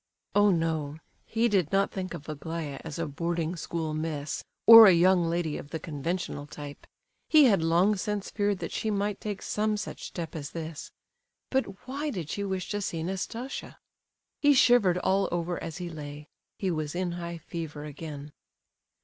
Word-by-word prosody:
Oh, 205 0 +5
no, 160 -4 0 0.3
he 230 +1 +2
did 190 -8 +1
not 195 0 +2
think 185 -2 -4
of 155 -3 -10
Aglaya 155 -1 -5
as 160 -3 -6
a 165 - -1
boarding 170 +2 -2
school 165 -1 -3
miss, 155 -1 -3 0.2
or 225 -1 +12
a - - +8
young 175 0 +4
lady 165 -2 -1
of 145 - -10
the 160 - -4
conventional 155 0 -4
type! 145 -1 -9 0.4
He 310 -2 +7
had 210 -10 +5
long 170 +6 +3
since 205 +1 -3
feared 205 -1 0
that - - -4
she 220 - -2
might 205 -1 -1
take 205 -2 -4
some 215 0 0
such - - -6
step 165 -3 -6
as 145 -2 -6
this. 160 -2 -6 0.6
But 260 -8 -1
why 285 +4 -2
did 175 - -4
she 200 - -2
wish 190 -2 -2
to 205 0 -1
see 165 -4 -3
Nastasia? 210 +8 -5 0.6
He 290 -1 +5
shivered 240 -8 +5
all 190 +2 +1
over 175 0 -2
as 165 -2 -5
he 175 - -5
lay; 150 -2 -8 0.3
he 190 -2 -1
was 155 -1 -3
in 180 -1 -1
high 170 0 -5
fever 160 -2 -6
again. 150 -1 -8
170 Hz, 175 wpm, -28 LUFS, 155-200 Hz, 0.6 s, or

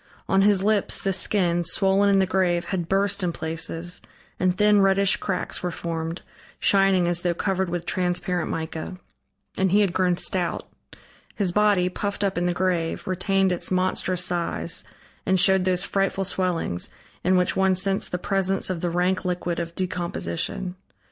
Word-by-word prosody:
On 195 0 +3
his 200 -1 +3
lips 210 -1 +1
the 195 - -1
skin, 175 -2 +1
swollen 195 +3 +2
in 200 - +4
the 190 - +3
grave, 180 -2 0
had 175 -4 -3
burst 200 +1 +1
in 180 -2 0
places, 165 +2 -3 0.4
and 185 0 +1
thin, 210 0 +4
reddish 195 0 +4
cracks 195 - -3
were 180 - -2
formed, 165 0 -5 0.4
shining 195 -3 +3
as 175 0 0
though 175 -1 0
covered 190 0 -1
with 175 0 -3
transparent 180 -1 -1
mica. 160 +3 -5 0.6
And 190 -1 +2
he 205 +2 +4
had 195 -4 +1
grown 180 -2 +1
stout. 180 -2 0 0.7
His 195 -4 +1
body, 205 -2 +3
puffed 200 +2 -3
up 195 -1 0
in 175 0 0
the - - +1
grave, 175 -3 -1
retained 190 +1 +1
its 175 - -1
monstrous 185 -1 0
size 175 -1 -1 0.4
and 190 0 +2
showed 190 0 +4
those 180 -1 +1
frightful 195 0 0
swellings, 180 - -2 0.3
in 185 +1 +3
which 180 0 +1
one 190 -1 +3
sensed 195 +1 0
the 180 - -1
presence 195 0 +1
of 170 -3 -4
the 175 - 0
rank 180 +2 0
liquid 175 -1 -2
of 170 0 -5
decomposition. 185 +1 -3
185 Hz, 170 wpm, -24 LUFS, 175-195 Hz, 0.7 s, in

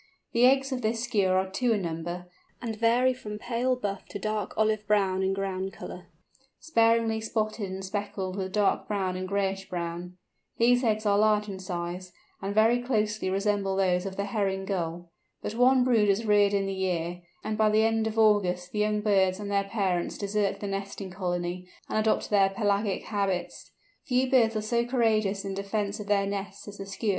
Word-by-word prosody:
The 240 +2 +6
eggs 270 +1 +3
of 255 -1 -2
this 225 +1 -1
Skua 215 -6 +1
are 190 +1 +2
two 240 +4 +1
in 205 -3 -1
number, 175 +2 -4 0.3
and 230 -2 -4
vary 235 +4 +3
from 210 -4 -7
pale 245 +3 0
buff 200 -5 -4
to - - -6
dark 215 -1 -2
olive 215 -1 +1
brown 195 -3 +2
in 190 0 +1
ground 195 0 -3
colour, - - -9 0.5
sparingly 230 -5 +2
spotted 215 -2 -2
and 190 0 -5
speckled 190 -1 -3
with 190 -1 -3
dark 205 0 +1
brown 190 -3 -1
and 185 0 -4
grayish 195 0 -1
brown. 175 0 -5 0.4
These 245 +2 +4
eggs 215 -2 +1
are 200 -1 +3
large 210 0 +3
in 195 -2 -6
size, 180 0 -5 0.3
and 200 +1 -3
very 225 +3 +4
closely 215 -5 0
resemble 195 0 0
those 185 -1 +1
of 190 - -6
the 200 - -2
Herring 195 -2 -1
Gull. 175 -2 -3 0.3
But - - -3
one 250 +2 +4
brood 230 -5 +3
is 200 +3 +1
reared 205 -1 +4
in 195 -1 +1
the 195 - -2
year, 175 -2 -2 0.2
and 215 - -2
by 215 0 +3
the 215 +1 +3
end 225 0 +2
of 220 0 -4
August 185 -5 +3
the 210 - -3
young 210 0 +1
birds 190 -3 +2
and 205 -1 -5
their 200 0 +1
parents 195 -4 -1
desert 205 0 -1
the 205 - -3
nesting 195 -1 -5
colony, 180 -1 -3 0.2
and - - 0
adopt 215 0 +1
their 195 -2 +5
pelagic 200 -1 0
habits. 195 -4 -2 0.4
Few 255 0 +2
birds 230 -4 +4
are 215 - 0
so 235 +2 +1
courageous 215 -5 +1
in 195 - -3
defence 200 +1 -2
of 210 - -7
their 200 -1 +2
nests 200 0 -5
as 205 0 -9
the 195 - -6
Skua. 200 +2 -3
205 Hz, 195 wpm, -28 LUFS, 190-220 Hz, 0.5 s, The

